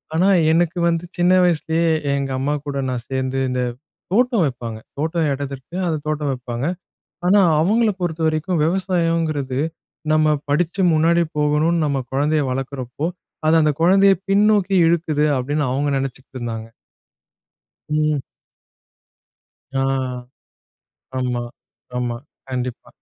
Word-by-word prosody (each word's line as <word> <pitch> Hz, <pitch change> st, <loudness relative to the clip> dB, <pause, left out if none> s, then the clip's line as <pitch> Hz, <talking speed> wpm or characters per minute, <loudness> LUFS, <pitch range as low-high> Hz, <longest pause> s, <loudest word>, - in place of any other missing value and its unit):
ஆனா, 185 Hz, +4 st, +4 dB, 0.2 s
எனக்கு 170 Hz, +1 st, +2 dB
வந்து 165 Hz, 0 st, 0 dB
சின்ன 175 Hz, +1 st, +4 dB
வயசுலேயே 165 Hz, -1 st, +1 dB, 0.3 s
எங்க 135 Hz, -1 st, -2 dB
அம்மா 145 Hz, +2 st, 0 dB
கூட 140 Hz, -1 st, -3 dB
நான் 120 Hz, -2 st, -3 dB
சேர்ந்து 130 Hz, 0 st, -2 dB
இந்த 125 Hz, 0 st, -1 dB, 0.5 s
தோட்டம் 240 Hz, -4 st, +3 dB
வைப்பாங்க. 120 Hz, -4 st, -4 dB, 0.2 s
தோட்டம் 160 Hz, 0 st, 0 dB
எடதிருக்கு. 140 Hz, +2 st, -6 dB
அந்த 160 Hz, -, 0 dB
தோட்டம் 150 Hz, -2 st, -1 dB
வைப்பாங்க. 125 Hz, 0 st, -4 dB, 0.6 s
ஆனா, 205 Hz, +3 st, +6 dB, 0.2 s
அவங்கள 215 Hz, +5 st, +3 dB
பொறுத்தவரைக்கும், 160 Hz, 0 st, 0 dB
"விவசாயங்கிறது, 165 Hz, -7 st, 0 dB, 0.5 s
நம்ம 155 Hz, -1 st, +4 dB
படிச்சு 175 Hz, +6 st, +1 dB
முன்னாடி 170 Hz, +2 st, +3 dB
போகணும்னு 150 Hz, +3 st, +2 dB
நம்ம 140 Hz, -2 st, 0 dB
குழந்தைய 150 Hz, +3 st, +1 dB
வளர்க்கிறப்போ, 135 Hz, +2 st, -3 dB, 0.4 s
அது 160 Hz, -, +5 dB
அந்த 150 Hz, -1 st, +2 dB
குழந்தைய 195 Hz, +3 st, +6 dB, 0.2 s
பின்னோக்கி 200 Hz, -1 st, +3 dB
இழுக்குது" 155 Hz, -3 st, +1 dB
அப்படின்னு 145 Hz, +3 st, -1 dB
அவங்க 145 Hz, +2 st, 0 dB
நினைச்சிட்டுருந்தாங்க. 125 Hz, -4 st, -5 dB, 1.2 s
ம். 150 Hz, -2 st, +1 dB, 1.6 s
ஆ, -, -, +2 dB, 1.4 s
ஆமா, 125 Hz, -1 st, -1 dB, 0.6 s
ஆமா. 120 Hz, -1 st, -2 dB, 0.3 s
கண்டிப்பா. 125 Hz, -1 st, -4 dB
155 Hz, 110 wpm, -21 LUFS, 135-170 Hz, 1.6 s, ஆனா